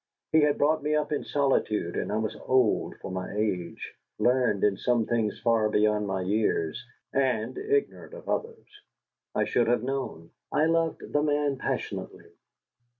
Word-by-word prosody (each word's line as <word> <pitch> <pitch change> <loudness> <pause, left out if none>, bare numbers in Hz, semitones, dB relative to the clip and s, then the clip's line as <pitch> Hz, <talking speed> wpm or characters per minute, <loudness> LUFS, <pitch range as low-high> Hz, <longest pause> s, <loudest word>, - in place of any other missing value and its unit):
He 160 - +5
had 150 -1 +3
brought 155 +2 +2
me 150 +1 0
up 150 0 0
in 150 - -1
solitude, 110 -10 0
and - - -2
I 105 - 0
was 110 -1 -2
old 130 -4 +2
for - - -7
my 95 +1 -4
age, 90 -6 -2 0.2
learned 125 -5 +2
in 105 -1 +4
some 120 +2 +1
things 110 -3 -1
far 115 -2 +2
beyond 105 0 +2
my 95 -1 -1
years, 95 -5 0 0.3
and 125 -4 +1
ignorant 425 +3 -1
of - - -12
others 460 0 -3 0.7
I - - +2
should 120 -2 +1
have 120 -1 +2
known. 130 -11 -4 0.2
I 150 +2 +3
loved 165 0 0
the 145 - +3
man 145 -2 +1
passionately. - - -4
120 Hz, 160 wpm, -27 LUFS, 105-145 Hz, 0.7 s, He